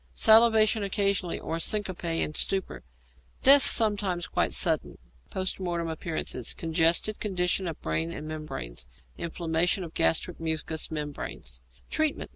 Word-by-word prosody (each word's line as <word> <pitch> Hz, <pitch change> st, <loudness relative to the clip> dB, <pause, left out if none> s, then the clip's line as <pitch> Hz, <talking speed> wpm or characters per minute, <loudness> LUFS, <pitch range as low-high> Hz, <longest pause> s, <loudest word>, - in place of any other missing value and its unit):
Salivation 220 Hz, -1 st, +5 dB
occasionally, 200 Hz, -3 st, 0 dB
or 165 Hz, -, -4 dB
syncope 195 Hz, 0 st, -2 dB, 0.2 s
and 155 Hz, -, -4 dB
stupor. 190 Hz, -, -1 dB, 0.6 s
Death 280 Hz, +1 st, +9 dB
sometimes 205 Hz, -9 st, +3 dB
quite -, -, -1 dB
suddenly. -, -, 0 dB, 0.3 s
Post 190 Hz, 0 st, -3 dB
Mortem 170 Hz, -2 st, -3 dB
Appearances. 160 Hz, -6 st, -3 dB
Congested 165 Hz, +5 st, +1 dB
condition 185 Hz, -2 st, -1 dB
of 165 Hz, -, -6 dB
brain 80 Hz, +1 st, -1 dB
and 150 Hz, -, -7 dB
membranes; 65 Hz, -, -7 dB, 0.3 s
inflammation 170 Hz, +2 st, -1 dB
of 165 Hz, -2 st, -9 dB
gastric 80 Hz, -, 0 dB
mucous 160 Hz, -1 st, -3 dB
membrane. 150 Hz, -2 st, -6 dB, 0.5 s
_Treatment. 310 Hz, -2 st, -1 dB
175 Hz, 120 wpm, -27 LUFS, 160-200 Hz, 0.6 s, Death